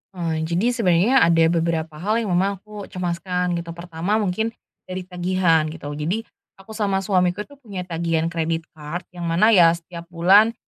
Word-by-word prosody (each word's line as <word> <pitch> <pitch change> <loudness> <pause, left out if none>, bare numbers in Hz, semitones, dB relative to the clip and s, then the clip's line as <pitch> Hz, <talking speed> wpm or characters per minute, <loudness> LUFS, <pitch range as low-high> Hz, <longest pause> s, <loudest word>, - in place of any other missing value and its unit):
Oh 170 -2 -2
jadi 170 +9 +1
sebenernya 225 +2 +3
ada 165 -4 +4
beberapa 165 -2 -1
hal 210 +5 0
yang 200 - -3
memang 190 +2 +1
aku 210 -2 -9
cemaskan 180 0 -2
gitu 170 0 -7
pertama 170 +3 -2
mungkin, 220 +2 -1 0.3
dari 185 0 -5
tagihan 180 -3 +1
gitu. 155 -2 -7
Jadi, 160 +10 -2 0.3
aku 195 +3 -15
sama 200 -3 -1
suamiku 180 +1 +1
tuh 285 +2 -18
punya 200 -8 -6
tagihan 165 -1 -1
credit 165 0 -1
card 155 +3 -6
yang 175 -2 -5
mana 180 +7 +4
ya 170 -5 +6
setiap 170 0 -10
bulan, 190 +7 +4
180 Hz, 170 wpm, -22 LUFS, 165-200 Hz, 0.3 s, ya